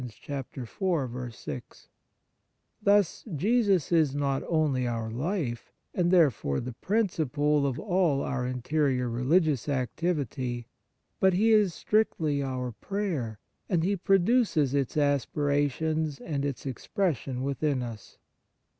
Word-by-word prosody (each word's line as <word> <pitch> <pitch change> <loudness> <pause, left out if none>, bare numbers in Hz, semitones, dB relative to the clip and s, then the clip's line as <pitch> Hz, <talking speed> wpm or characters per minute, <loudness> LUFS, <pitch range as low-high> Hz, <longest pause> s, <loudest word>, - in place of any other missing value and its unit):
t 135 +5 -6 2.4
Thus, 205 -3 +3
Jesus 200 - +2
is 155 -5 +3
not 140 -1 0
only 145 -6 +1
our 115 -2 -3
life, 130 - -3 0.2
and 175 -1 +1
therefore 145 - +3
the 125 +1 -5
principle 150 - +1
of 130 -2 -2
all 175 -8 +1
our 135 -2 -2
in 125 -1 -4
terior 130 -5 +1
religious 145 +2 +2
activity, 130 -3 -2 0.5
but 190 -1 +4
He 215 +5 +3
is 210 -6 +4
strictly 160 -9 +1
our 130 -2 -3
prayer, 155 - -3 0.3
and 170 -4 +2
He 200 +3 +1
produces 195 - +2
its 140 0 0
aspirations 145 +2 +1
and 145 -3 -3
its 140 -2 -4
expression 135 - -2
within 140 -1 0
us. 115 -3 -9
145 Hz, 110 wpm, -28 LUFS, 130-175 Hz, 2.4 s, but